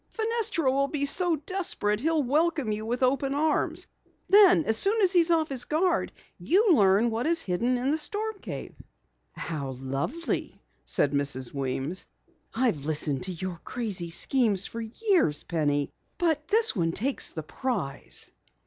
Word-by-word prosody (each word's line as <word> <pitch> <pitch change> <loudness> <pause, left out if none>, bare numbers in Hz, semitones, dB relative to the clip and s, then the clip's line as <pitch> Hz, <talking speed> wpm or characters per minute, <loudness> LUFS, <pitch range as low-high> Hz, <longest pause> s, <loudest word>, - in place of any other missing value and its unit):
Fenestra 440 - 0
will 275 +1 +1
be 285 0 -2
so 350 +3 +2
desperate 300 - -1
he'll 315 +3 +1
welcome 295 -2 0
you 215 +1 -4
with 245 +3 -2
open 275 +2 +1
arms. 310 +1 +1 0.4
Then 390 -4 +6
as 220 - +3
soon 400 - +4
as 370 - +5
he's 345 -2 +4
off 320 -2 +2
his 255 -3 -2
guard 355 +4 0 0.3
you 400 +4 +3
learn 205 -1 +3
what 230 +6 -2
is 335 0 +3
hidden 235 +8 0
in 255 +3 -1
the 315 - 0
storm 425 +4 -3
cave." - - -7 0.6
"How 140 -5 -5
lovely," 135 - -4 0.3
said 140 - +1
Mrs. 140 -3 0
Weems. 135 +5 -1 0.4
"I've 225 - -1
listened 150 -2 -2
to 185 - -4
your 180 -1 -6
crazy 205 -8 -3
schemes 205 +1 +2
for 230 - -6
years, 240 - 0
Penny, 145 -4 -1 0.3
but 315 -3 0
this 450 - +2
one 165 -4 0
takes 260 +9 0
the 160 - -7
prize!" 185 - -2
250 Hz, 155 wpm, -27 LUFS, -, 0.6 s, Then